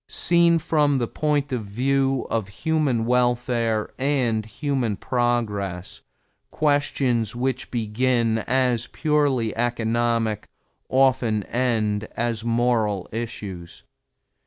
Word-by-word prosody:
Seen 170 -1 +4
from 150 -3 +2
the 120 -2 -1
point 145 0 -1
of 125 -4 -2
view 135 +5 0
of 110 -4 -1 0.2
human 150 -8 +1
welfare 120 -2 +1
and 130 -5 +1
human 115 -1 -2
progress, 105 -7 -2 0.5
questions 140 -6 0
which 130 0 -2
begin 115 0 0
as 125 0 0
purely 145 -7 0
economic 115 -1 0 0.4
often 130 -5 +2
end 110 -3 0
as 115 -1 -1
moral 115 -4 0
issues. 100 -6 -6
120 Hz, 95 wpm, -23 LUFS, 110-135 Hz, 0.5 s, Seen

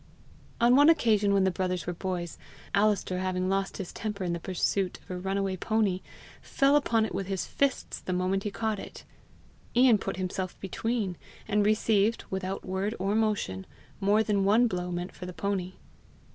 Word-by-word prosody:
On 240 +1 +5
one 290 +3 +7
occasion 215 -10 +3
when 200 -1 +4
the 190 - +3
brothers 185 -1 -2
were 175 - -2
boys, 175 -1 -4 0.3
Alister 200 -3 +2
having 185 0 -1
lost 195 0 -1
his 190 -3 -6
temper 210 -3 -4
in 175 -1 -1
the 170 - -3
pursuit 185 +1 -1
of - - -13
a 180 - -3
runaway 195 0 -1
pony, 205 -2 0 0.4
fell 275 +1 +2
upon 230 -6 +3
it - - -6
with 195 - -3
his 190 -2 -2
fists 280 -1 -1
the - - -5
moment 185 +2 0
he 210 - -2
caught 220 0 -2
it. - - -9 0.7
Ian 245 -3 +6
put - - -4
himself 185 0 -3
between, 200 -1 -2 0.3
and 210 -1 +2
received, 215 0 +2
without 190 0 -3
word 190 +4 -2
or 195 +2 0
motion, 210 - 0 0.3
more 205 +2 +3
than 205 -2 +1
one 215 +5 +5
blow 180 -5 -2
meant 175 +1 -3
for 180 - -9
the 180 - -6
pony. 190 -1 -2
195 Hz, 180 wpm, -28 LUFS, 185-215 Hz, 0.7 s, one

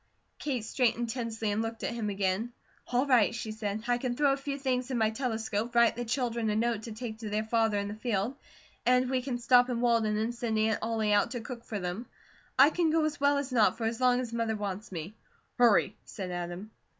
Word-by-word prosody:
Kate 255 -7 -2
straightened 235 -1 0
tensely 225 -3 -2
and 210 +2 0
looked 225 0 -5
at - - -1
him 225 -3 -2
again. 200 +3 -1 0.4
"All 250 +2 +1
right," 240 -5 +4
she 220 -1 -4
said. 215 0 -4
"I 245 0 +2
can 245 -1 -2
throw 280 0 +3
a - - -2
few 275 0 -4
things 255 -2 -1
in 255 - -1
my 220 -1 +2
telescope, 225 -1 -2
write 235 -1 +5
the 240 - -3
children 235 -2 -1
a 210 - 0
note 230 0 0
to 225 - -8
take 220 0 -6
to 220 -2 -5
their 210 +1 0
father 225 -1 +1
in 200 0 -1
the 205 - -5
field, 220 +2 -2 0.5
and 250 +1 +3
we 260 -1 +1
can 250 -1 -3
stop 245 +1 +4
in 240 -2 -1
Walden 230 -3 +2
and 225 +3 -1
send 235 -2 -2
Aunt 215 0 +2
Ollie 220 -2 0
out 205 - +3
to 245 - -4
cook 235 0 -8
for 215 - -5
them; 180 +6 -4 0.5
I 275 +4 +7
can 340 -1 +1
go 315 0 +2
as 300 -1 -2
well 285 0 +3
as 280 -2 -3
not, 225 -2 +3
for 230 - -5
as 225 +2 -2
long 250 -1 +4
as 240 -2 -4
Mother 230 -1 0
wants 205 0 -5
me." 175 +2 -6 0.5
"Hurry!" 220 -4 +4
said 185 -3 -6
Adam. 175 +4 -5
230 Hz, 235 wpm, -30 LUFS, 215-250 Hz, 0.5 s, I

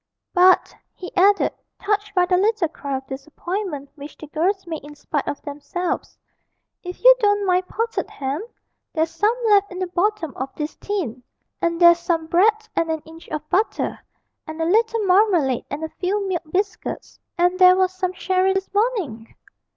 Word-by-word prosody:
'But,' 365 0 +4 0.2
he 365 - -9
added, 400 +2 +4 0.3
touched 410 0 -1
by 360 -1 +4
the 365 0 +2
little 410 -1 +2
cry 280 -3 -4
of 265 - -9
disappointment 300 +3 -5
which 290 0 -11
the - - -9
girls 360 +6 -1
made 320 -4 -6
in 295 +1 -11
spite 295 0 -3
of 290 - -3
themselves, 295 +5 -4 0.6
'if 360 0 -8
you - - +9
don't 410 -2 +2
mind 365 0 +1
potted 455 +1 -2
ham 280 +6 -4 0.5
there's 320 0 0
some 425 +6 +1
left 405 -2 +4
in 365 - -7
the 370 - -1
bottom 360 - -1
of 265 +1 -4
this 300 0 -4
tin, 315 - -3 0.4
and 335 0 0
there's 345 -1 +7
some 340 -2 -1
bread 430 +6 +2
and 330 - 0
an 320 -1 -2
inch 325 +1 -14
of 305 0 -5
butter, 415 +4 0 0.5
and 315 +1 -7
a 325 - 0
little 445 +4 +2
marmalade 360 - +3
and 295 +3 -5
a 320 - -3
few 395 +2 -1
milk 360 -3 -1
biscuits 400 +3 -3 0.2
and 355 +1 +2
there 365 0 +8
was 370 0 +1
some 370 -1 -2
sherry 370 +1 +1
this 385 0 -3
morning!' 400 - -1
360 Hz, 175 wpm, -22 LUFS, 315-405 Hz, 0.6 s, you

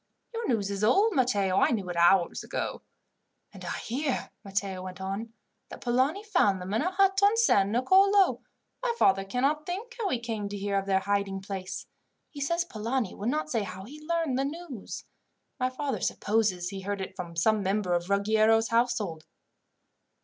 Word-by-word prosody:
"Your 460 0 -3
news 205 -5 0
is 200 +1 -3
old, 400 - +4
Matteo. 205 - +2
I - - +4
knew 205 -6 -1
it 175 - -4
hours 170 +1 +3
ago." - - -4 0.7
"And - - -11
I - - -3
hear," 265 +3 -2
Matteo 195 -1 -2
went 185 0 -8
on, 195 +4 -4 0.4
"that - - -9
Polani 265 +11 +1
found 345 - +2
them 185 +2 -5
in 220 - +2
a 350 - +1
hut 385 +1 +3
on 405 +3 +5
San 200 - +4
Nicolo. 380 - +4 0.4
My - - 0
father 195 - +4
cannot 275 +9 0
think 410 +7 -5
how 420 -4 0
he 250 - 0
came 220 -4 -4
to 205 - -5
hear 200 0 -2
of 195 - -7
their 190 -1 +2
hiding 200 -1 -1
place. 190 -1 -6 0.5
He 285 - -8
says 340 +5 0
Polani 230 - -2
would 210 +4 -3
not 305 +3 -1
say 230 - +1
how 190 -1 -6
he 295 +7 -11
learned 325 -6 0
the 270 - +1
news. 290 - -7 0.5
My 255 0 +1
father 265 -2 -3
supposes 205 -5 0
he 195 0 -6
heard 200 +1 -3
it 190 0 -6
from 175 -3 -7
some 215 +6 +2
member 195 -1 0
of 175 +1 -1
Ruggiero's 220 +3 +3
household." 230 -9 0
220 Hz, 185 wpm, -28 LUFS, 195-290 Hz, 0.7 s, on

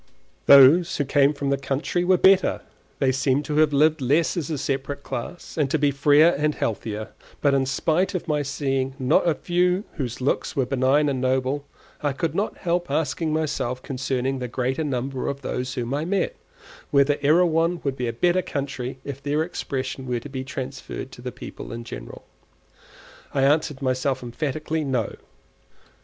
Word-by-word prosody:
Those 140 +6 +7
who 145 - 0
came 140 +1 +4
from 140 -2 -2
the 140 - +1
country 140 +6 -1
were 185 +1 +4
better; 190 +1 +4 0.4
they 135 -2 +2
seemed 135 +2 +1
to 150 +1 -2
have 155 -1 +4
lived 155 +2 +3
less 145 +6 +2
as 170 -5 -3
a 155 - -2
separate 140 0 -3
class, 135 +7 -6
and 145 -3 +2
to 160 - +1
be 145 -1 +2
freer 145 +3 +5
and 150 0 +1
healthier; 110 0 -3 0.3
but 140 -1 +2
in 135 -1 +2
spite 165 +8 0
of 180 - -3
my 150 -2 +1
seeing 135 -2 -2
not 130 +6 +3
a 160 - +1
few 180 +3 +1
whose 125 -4 -3
looks 130 +2 -1
were 135 - +1
benign 135 +3 +2
and 135 -3 -1
noble, 130 +2 0 0.3
I 145 -2 0
could 165 +4 -2
not 205 +2 -2
help 175 0 -1
asking 160 0 -1
myself 145 -5 -2
concerning 135 0 -2
the 125 - -3
greater 130 +5 -1
number 135 -2 -2
of 140 0 -3
those 125 -1 -3
whom 125 +1 -3
I 145 +2 -1
met, 185 +2 -1 0.5
whether 145 0 +3
Erewhon 165 +3 +3
would 140 -2 -1
be 125 -2 -2
a - - 0
better 175 +9 +2
country 135 -5 -4
if 140 -1 -7
their 145 +2 0
expression 135 -5 -4
were 125 -1 -1
to 135 - -10
be 130 -1 -4
transferred 135 0 -6
to 120 - -12
the 125 0 -5
people - - -9
in 115 0 -6
general. - - -9 1.1
I 135 - +2
answered 145 0 +1
myself 130 0 0
emphatically, 150 +5 -3
no. 125 -6 -1
140 Hz, 180 wpm, -24 LUFS, 130-155 Hz, 1.1 s, Those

